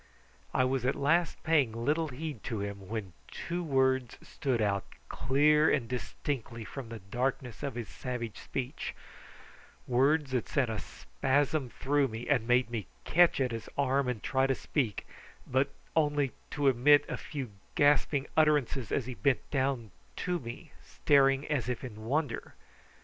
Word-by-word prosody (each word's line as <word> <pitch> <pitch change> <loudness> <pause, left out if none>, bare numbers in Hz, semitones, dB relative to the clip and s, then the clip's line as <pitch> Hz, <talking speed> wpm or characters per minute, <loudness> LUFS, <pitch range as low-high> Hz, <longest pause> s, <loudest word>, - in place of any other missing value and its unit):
I 130 - +2
was 130 -1 0
at 130 +2 +1
last 165 +5 +1
paying 145 -8 +3
little 150 +8 0
heed 145 -3 -6
to 110 - -2
him 100 -1 -5
when 105 -5 -4 0.2
two 175 +1 -4
words 130 -4 +1
stood 130 -4 -2
out 100 -3 +1 0.3
clear 150 +4 +4
and 115 - +1
distinctly 120 -1 -4
from 130 -1 -7
the 115 - -6
darkness 125 +3 -3
of 140 -4 -3
his 120 -3 -4
savage 120 +1 -5
speech, 130 0 -4 0.9
words 135 +3 +2
that 125 -3 -1
sent 130 -6 +1
a 110 - -2
spasm 140 0 -1
through 140 +3 +1
me 115 0 -6
and 125 -6 +2
made 125 0 +3
me 115 -4 -3 0.2
catch 175 -2 +4
at 130 -2 +1
his 115 -1 -5
arm 140 -1 +2
and 125 -4 -3
try 130 0 +2
to 135 - +1
speak, 125 -8 -2 0.4
but 130 +2 +1 0.3
only 145 -4 +2 0.2
to 145 -2 0
emit 135 +3 +6
a - - -3
few 135 -7 -6 0.2
gasping 145 -1 +3
utterances 145 -6 +2
as 135 - 0
he 130 - -5
bent 135 +1 +1
down 130 -6 0 0.2
to 180 -1 -1
me 130 +5 -8
staring 135 -1 +3
as 135 -6 -1
if 125 - -3
in 110 -4 -8
wonder. 140 0 -2
130 Hz, 160 wpm, -31 LUFS, 120-145 Hz, 0.9 s, emit